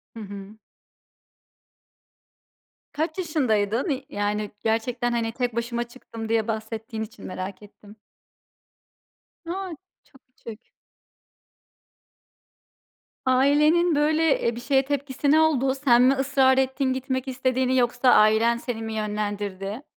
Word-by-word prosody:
Hı -, -, -8 dB
hı. 200 Hz, +1 st, -9 dB, 2.4 s
Kaç 315 Hz, +3 st, -2 dB
yaşındaydın? 255 Hz, -, 0 dB
Y 270 Hz, -1 st, -2 dB
yani 205 Hz, 0 st, -2 dB
gerçekten, 240 Hz, +2 st, 0 dB
hani, 230 Hz, -1 st, -1 dB
tek 245 Hz, -2 st, -2 dB
başıma 235 Hz, 0 st, -2 dB
çıktım, 230 Hz, -2 st, -9 dB
diye 225 Hz, -1 st, +1 dB
bahsettiğin 220 Hz, +1 st, -4 dB
için 225 Hz, +3 st, -11 dB
merak 185 Hz, +1 st, -6 dB
ettim. 210 Hz, 0 st, -16 dB, 1.5 s
A, 365 Hz, 0 st, -4 dB, 0.3 s
çok 270 Hz, -, -23 dB
küçük. 230 Hz, -2 st, -11 dB, 2.6 s
Ailenin 295 Hz, +6 st, +3 dB
böyle, 310 Hz, +1 st, +2 dB
eee, 235 Hz, 0 st, 0 dB
bir, 240 Hz, -, -7 dB
şeye 270 Hz, 0 st, +2 dB
tepkisi 280 Hz, 0 st, -1 dB
ne 315 Hz, -, +5 dB
oldu? 270 Hz, -4 st, +2 dB
Sen 250 Hz, -3 st, +4 dB
mi 260 Hz, +2 st, +5 dB
ısrar 270 Hz, -1 st, +3 dB
ettin, 265 Hz, 0 st, +1 dB
gitmek 260 Hz, 0 st, -3 dB
istediğini? 255 Hz, 0 st, 0 dB
Yoksa, 245 Hz, +1 st, +2 dB
ailen 220 Hz, +2 st, +4 dB
seni 235 Hz, -2 st, -5 dB
mi, 220 Hz, 0 st, -5 dB
yönlendirdi? 205 Hz, +1 st, -4 dB
245 Hz, 115 wpm, -24 LUFS, 220-270 Hz, 2.6 s, ne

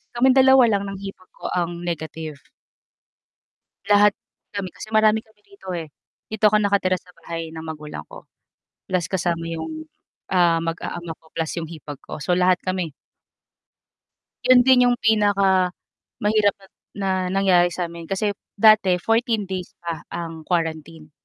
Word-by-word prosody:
kaming 260 Hz, +2 st, +4 dB
2 265 Hz, 0 st, +7 dB
lang 200 Hz, -2 st, +1 dB
ng 195 Hz, -1 st, -7 dB
hipag 195 Hz, -2 st, -9 dB
ko -, -, -7 dB
ang 175 Hz, -1 st, -2 dB
negative. 160 Hz, -2 st, -5 dB, 1.5 s
Lahat 205 Hz, 0 st, +6 dB, 0.4 s
kami 200 Hz, -2 st, -3 dB
kasi -, -, -9 dB
marami 220 Hz, 0 st, +4 dB
kami 220 Hz, -1 st, -29 dB
rito 200 Hz, -1 st, -16 dB
eh. 165 Hz, -3 st, -4 dB, 0.4 s
Dito 215 Hz, -1 st, +3 dB
ako 215 Hz, 0 st, +3 dB
nakatira 200 Hz, -2 st, +2 dB
sa 180 Hz, -, -21 dB
bahay 165 Hz, -1 st, -5 dB
ng 160 Hz, 0 st, -7 dB
magulang 150 Hz, -, -7 dB
ko -, -, -12 dB, 0.6 s
plus 180 Hz, -3 st, -1 dB
kasama 170 Hz, -2 st, -1 dB
'yung, 315 Hz, -, -6 dB, 0.4 s
ah, 175 Hz, -3 st, +3 dB
mag-aama 165 Hz, 0 st, -4 dB
ko 160 Hz, 0 st, -26 dB
plus 160 Hz, -1 st, -2 dB
'yung 165 Hz, -2 st, -4 dB
hipag 150 Hz, -3 st, -8 dB
ko. -, -, -8 dB
So, 175 Hz, +4 st, 0 dB
lahat 180 Hz, 0 st, +3 dB
kami. 185 Hz, -4 st, -3 dB, 1.5 s
'Yon 255 Hz, -1 st, +7 dB
din 260 Hz, -1 st, +6 dB
'yong 245 Hz, -, +2 dB
pinakamahirap 205 Hz, 0 st, +1 dB
na 195 Hz, -1 st, -19 dB, 0.3 s
na 195 Hz, -1 st, 0 dB, 0.2 s
nangyari 185 Hz, -2 st, +3 dB
sa'min 170 Hz, -2 st, -5 dB
kasi 205 Hz, +2 st, 0 dB, 0.3 s
dati 215 Hz, -4 st, +6 dB
14 225 Hz, +2 st, +1 dB
days 185 Hz, -1 st, -5 dB
pa 170 Hz, -2 st, -5 dB
ang 165 Hz, -2 st, -6 dB
quarantine. 160 Hz, -2 st, -3 dB
185 Hz, 145 wpm, -22 LUFS, 165-210 Hz, 1.5 s, 2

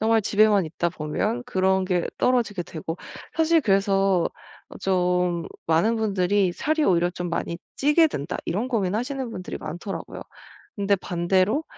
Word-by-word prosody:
정말 220 Hz, 0 st, +3 dB
집에만 205 Hz, -2 st, +4 dB
있다 170 Hz, +2 st, -2 dB
보면 185 Hz, +10 st, -2 dB
그런 190 Hz, 0 st, +2 dB
게 180 Hz, -2 st, 0 dB
떨어지게 230 Hz, -7 st, +1 dB
되고 165 Hz, +1 st, -6 dB, 0.4 s
사실 325 Hz, 0 st, +4 dB
그래서 195 Hz, -3 st, +3 dB, 0.5 s
어 -, -, -10 dB
좀 180 Hz, -2 st, +1 dB, 0.2 s
많은 170 Hz, +9 st, +3 dB
분들이 200 Hz, -3 st, +1 dB
살이 310 Hz, -, 0 dB
오히려 175 Hz, -1 st, +3 dB
좀 175 Hz, -1 st, -5 dB
많이 170 Hz, 0 st, -3 dB, 0.2 s
찌게 300 Hz, +4 st, +4 dB
된다 145 Hz, -, -4 dB
이런 210 Hz, +9 st, -1 dB
고민하시는 235 Hz, +4 st, -1 dB
분들이 185 Hz, -4 st, -6 dB
많더라고요. 175 Hz, +5 st, -6 dB, 0.6 s
근데 200 Hz, 0 st, +2 dB
반대로 185 Hz, -, +1 dB
195 Hz, 315 characters per minute, -24 LUFS, 175-225 Hz, 0.6 s, 집에만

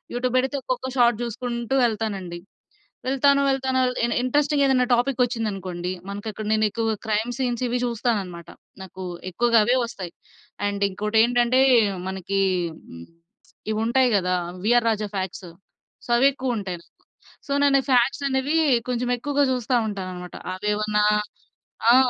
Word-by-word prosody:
YouTube 250 Hz, +1 st, -1 dB
పెడితే, 265 Hz, +2 st, -1 dB
ఒక్కొక్క 255 Hz, 0 st, -3 dB
shot 235 Hz, -2 st, +4 dB
చూసుకుంటూ 235 Hz, +1 st, -3 dB
వెళ్తానండి. 200 Hz, -6 st, -3 dB, 0.7 s
వెళ్తాను, 280 Hz, +1 st, +3 dB
వెళ్తాను 265 Hz, -1 st, 0 dB
అల 250 Hz, -, +1 dB
ఎన్ 235 Hz, -, -2 dB
ఇంట్రెస్టింగ్ 290 Hz, +2 st, +2 dB
ఏదైనా 255 Hz, -2 st, +3 dB
టాపిక్ 250 Hz, +1 st, +1 dB
వచ్చిందనుకోండి, 195 Hz, -7 st, -3 dB, 0.2 s
మనకి 205 Hz, +2 st, -6 dB
ఇక్కడ 215 Hz, 0 st, -7 dB
నేను 220 Hz, 0 st, +3 dB
ఎక్కువగా 225 Hz, +1 st, -1 dB
క్రైమ్ 220 Hz, +2 st, 0 dB
సీన్స్ 245 Hz, -2 st, -1 dB
ఇవి 245 Hz, +1 st, -1 dB
చూస్తానన్నమాట. 205 Hz, -8 st, -2 dB, 0.3 s
నాకు 190 Hz, 0 st, -9 dB, 0.3 s
ఎక్కువగా 235 Hz, +5 st, +2 dB
అవే 245 Hz, +4 st, +2 dB
వస్తాయి. 190 Hz, -7 st, -7 dB, 0.5 s
అండ్ 200 Hz, 0 st, -2 dB
ఇంకోటి 210 Hz, +3 st, -2 dB
ఏంటంటే, 245 Hz, +2 st, +3 dB, 0.5 s
మనకి 190 Hz, +1 st, -2 dB, 0.5 s
హ్మ్, 85 Hz, 0 st, -10 dB, 0.7 s
ఇవి 215 Hz, -, -1 dB
ఉంటాయి 255 Hz, +2 st, +3 dB
కదా! 180 Hz, -1 st, 0 dB, 0.3 s
వీఆర్ 240 Hz, +1 st, +4 dB
రాజా 215 Hz, -1 st, -1 dB
ఫాక్ట్సు. 185 Hz, -2 st, -4 dB, 0.6 s
సో, -, -, -15 dB
అవి 270 Hz, +3 st, +5 dB
ఎక్కువ 255 Hz, -3 st, -2 dB
ఉంటాయి 190 Hz, -4 st, -4 dB
నాకు. -, -, -32 dB, 0.5 s
సో, -, -, -6 dB
నేను 275 Hz, -1 st, +4 dB
ఫాక్ట్స్ 255 Hz, +3 st, +3 dB
అనేవి 265 Hz, +4 st, 0 dB, 0.3 s
కొంచెం 245 Hz, 0 st, -1 dB
ఎక్కువగా 285 Hz, +3 st, +1 dB
చూస్తూ 250 Hz, 0 st, -1 dB
ఉంటానన్నమాట. 185 Hz, -3 st, -6 dB, 0.2 s
అవి 210 Hz, +3 st, -3 dB
ఏవన్నా 210 Hz, 0 st, +1 dB, 0.9 s
ఆ! -, -, +7 dB
235 Hz, 145 wpm, -24 LUFS, 200-255 Hz, 0.9 s, ఆ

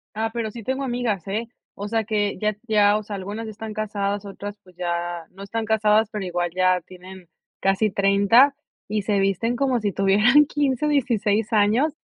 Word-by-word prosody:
Ah, 225 Hz, +1 st, -1 dB
pero 230 Hz, -2 st, -2 dB
sí 230 Hz, +1 st, -9 dB
tengo 265 Hz, +4 st, -2 dB
amigas, 240 Hz, -8 st, -2 dB
eh, 220 Hz, +4 st, -2 dB, 0.3 s
o 205 Hz, +1 st, -5 dB
sea, 225 Hz, +1 st, 0 dB
que 205 Hz, -2 st, -1 dB
ya 215 Hz, 0 st, 0 dB
ya, 210 Hz, -1 st, +4 dB
o 215 Hz, -, -5 dB
sea, 205 Hz, 0 st, -6 dB
algunas 205 Hz, +4 st, -5 dB
ya 220 Hz, -, -6 dB
están 215 Hz, 0 st, -7 dB
casadas 205 Hz, -1 st, -2 dB
otras, 200 Hz, +1 st, -7 dB
pues, 185 Hz, -1 st, -20 dB
ya 175 Hz, -1 st, -3 dB
no 195 Hz, +2 st, -12 dB
están 225 Hz, +3 st, -3 dB
casadas, 215 Hz, 0 st, +3 dB
pero 210 Hz, -3 st, -4 dB
igual 175 Hz, -1 st, -1 dB
ya 185 Hz, -1 st, +3 dB
tienen 185 Hz, 0 st, -13 dB, 0.3 s
casi 195 Hz, +2 st, +1 dB
30, 200 Hz, +8 st, +4 dB, 0.3 s
y 210 Hz, 0 st, -2 dB
se 200 Hz, -1 st, +1 dB
visten 195 Hz, +5 st, 0 dB
como 260 Hz, -2 st, +1 dB
si 210 Hz, -2 st, -1 dB
tuvieran 210 Hz, +10 st, +4 dB
15 290 Hz, -1 st, 0 dB
o -, -, +1 dB
16 225 Hz, -5 st, +1 dB
años, 225 Hz, +9 st, +3 dB
210 Hz, 195 wpm, -23 LUFS, 195-225 Hz, 0.3 s, ya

